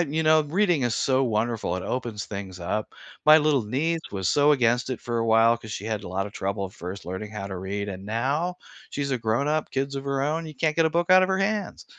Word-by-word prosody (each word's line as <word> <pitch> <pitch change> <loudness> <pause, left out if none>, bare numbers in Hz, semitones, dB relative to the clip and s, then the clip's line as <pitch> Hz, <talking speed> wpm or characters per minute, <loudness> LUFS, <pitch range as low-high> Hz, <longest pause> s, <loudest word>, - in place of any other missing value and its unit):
you 160 0 -1
know, 155 0 +5
reading 175 0 +1
is 120 -2 +1
so 130 +4 +2
wonderful, 110 -4 -1
it 95 - -5
opens 115 -3 -3
things 95 -3 -7
up. 105 +5 -3 0.3
My 155 +1 +9
little 150 -4 +2
niece 160 +9 -1
was 95 -3 -1
so 145 +1 +4
against 120 -2 +2
it 125 - -3
for 120 -1 -2
a 115 - 0
while 115 +1 +5
'cause 110 -2 -9
she 105 - -5
had 110 -2 -3
a - - -6
lot 95 +2 -2
of 100 - -10
trouble 100 0 -2
first 90 +1 -8
learning 95 +4 -5
how 100 -2 -5
to 95 - -5
read 100 +2 -4
and 95 -1 -6
now 140 - -1 0.3
she's 140 -1 -3
a 130 - 0
grown-up, 140 +8 0
kids 135 +1 -2
of 135 - -5
her 140 -1 -1
own, 160 +3 -1
you 155 - -9
can't 150 +3 0
get 165 - +4
a - - 0
book 170 +2 0
out 185 0 +8
of 185 - +2
her 190 - +1
hands 205 +1 -2
125 Hz, 250 wpm, -25 LUFS, 105-155 Hz, 0.3 s, My